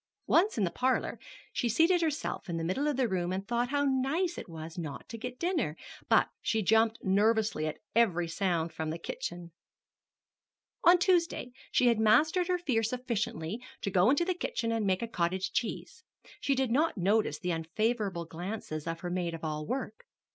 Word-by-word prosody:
Once 375 - +3
in 210 - +2
the 175 - +1
parlor, 255 +8 0 0.3
she 240 - 0
seated 335 - +4
herself 310 - -2
in 170 - -2
the 165 - -2
middle 225 - 0
of 295 -3 0
the 260 -2 +2
room 180 -3 -1
and 190 +1 -3
thought 240 +1 0
how 285 0 +1
nice 280 +7 +1
it - - -8
was 160 0 -8
not 155 -5 -6
to 230 - -7
get 250 +2 -6
dinner; 310 - -1 0.3
but - - +5
she 220 -1 0
jumped 225 +3 +3
nervously 210 -3 +2
at 155 - -4 0.2
every 180 -7 +3
sound 165 -1 -1
from 160 -1 -3
the 160 - -3
kitchen. 170 0 -6 1.3
On 350 +1 +8
Tuesday 345 -7 +1 0.2
she 250 - +3
had 235 -2 +4
mastered 310 - +4
her 365 -1 +2
fear 270 -10 0
sufficiently 225 -5 -2 0.2
to 200 - -2
go 185 +3 +4
into 290 +5 +3
the 370 - +1
kitchen 230 -9 -2
and 225 -3 0
make 185 +3 +1
a - - -2
cottage 185 -2 -1
cheese. 460 - -3 0.4
She 275 - +1
did 260 -2 0
not 300 +1 +2
notice 195 -4 +2
the 180 +2 -2
unfavorable 190 +2 -1
glances 170 -2 -5
of 165 0 -3
her 175 - -4
maid 175 -2 -1
of 165 - -10
all 150 -1 -3
work. 255 -5 -4
220 Hz, 190 wpm, -30 LUFS, 175-265 Hz, 1.3 s, On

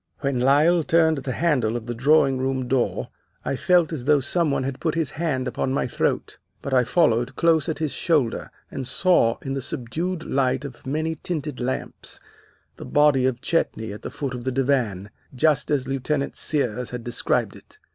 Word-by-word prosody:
When 140 -3 0
Lyle 150 +7 +4
turned 160 -1 +3
the 135 -1 -4
handle 125 -7 +1
of 115 - -8
the 120 - -3
drawing 135 +1 +3
room 130 -1 -1
door, 130 -1 0 0.4
I - - -1
felt 175 +2 +3
as 130 -6 -5
though 150 0 +5
some 160 +4 +1
one 140 - 0
had 135 0 -4
put 160 -2 -1
his 165 -5 -1
hand 145 -6 -2
upon 130 +1 -2
my - - 0
throat. - - -2 0.2
But 140 - -3
I 125 -1 +5
followed 120 -5 +2
close 165 -1 +2
at 160 - -2
his 155 -3 -1
shoulder, 150 -9 0 0.2
and 130 -2 -4
saw, 130 -5 +3
in 135 - -3
the 135 - -2
subdued 160 +10 -3
light 135 0 0
of 130 -1 -10
many 155 +4 -1
tinted 150 -5 -4
lamps, 130 +1 -4 0.6
the - - -8
body 145 -3 +4
of 125 -1 -2
Chetney 110 -11 -1
at 105 - -9
the - - -5
foot 135 -3 -4
of 125 -1 -6
the 130 - -1
divan, 125 -7 0 0.2
just 150 +2 +2
as 135 -3 0
Lieutenant 140 +1 -2
Sears 125 -5 -1
had 125 -1 -6
described 120 0 0
it. - - -16
135 Hz, 190 wpm, -24 LUFS, 125-155 Hz, 0.6 s, though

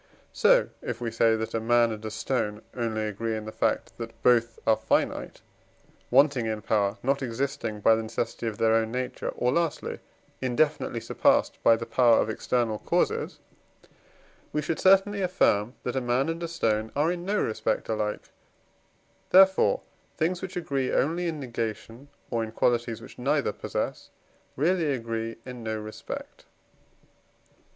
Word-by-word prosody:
So, - - +4
if - - -4
we 120 -2 -3
say 115 0 +3
that 110 0 -4
a 115 - 0
man 120 +1 +3
and 110 0 -6
a 110 - -3
stone 110 -1 -2
only 115 -3 -1
agree 110 +1 -2
in 110 - -6
the 110 - -6
fact 110 - -1
that 115 -1 -7
both 115 -2 +3
are 110 - +5
finite - - -1 0.7
wanting 135 -2 +4
in 110 -1 -3
power, 100 -2 +1
not 135 +2 +1
existing 120 -4 -3
by 115 - +6
the 110 - +1
necessity 115 +1 -3
of 110 -2 -3
their 110 +1 +3
own 115 0 +2
nature, 125 +1 -3
or, 125 - 0
lastly, 170 -1 -1 0.4
indefinitely 130 -1 0
surpassed - - +2
by 115 - +6
the 115 +1 -5
power 115 0 +4
of 110 - +1
external 115 -1 -1
causes - - 0 1.1
we 150 - -1
should 160 +2 -2
certainly 195 +1 +4
affirm 125 - +2
that 125 - -3
a 130 - +1
man 125 +4 +1
and 165 +1 -3
a 170 - -2
stone 110 -9 -1
are 150 +4 +2
in 175 -1 -4
no 205 +3 0
respect 110 - -1
alike; 105 -1 -3 1.0
therefore, 190 +1 +5 0.4
things 170 +2 0
which 190 -1 -5
agree 135 -6 -1
only 170 +5 +1
in 160 -2 -3
negation, 115 0 -5 0.2
or 115 -2 0
in 110 - -6
qualities 120 0 0
which - - -13
neither - - +1
possess, - - -4 0.5
really 160 0 +1
agree 115 -2 -3
in 125 -1 -8
no 110 -1 -3
respect. 110 0 -8
120 Hz, 160 wpm, -27 LUFS, 110-145 Hz, 1.1 s, by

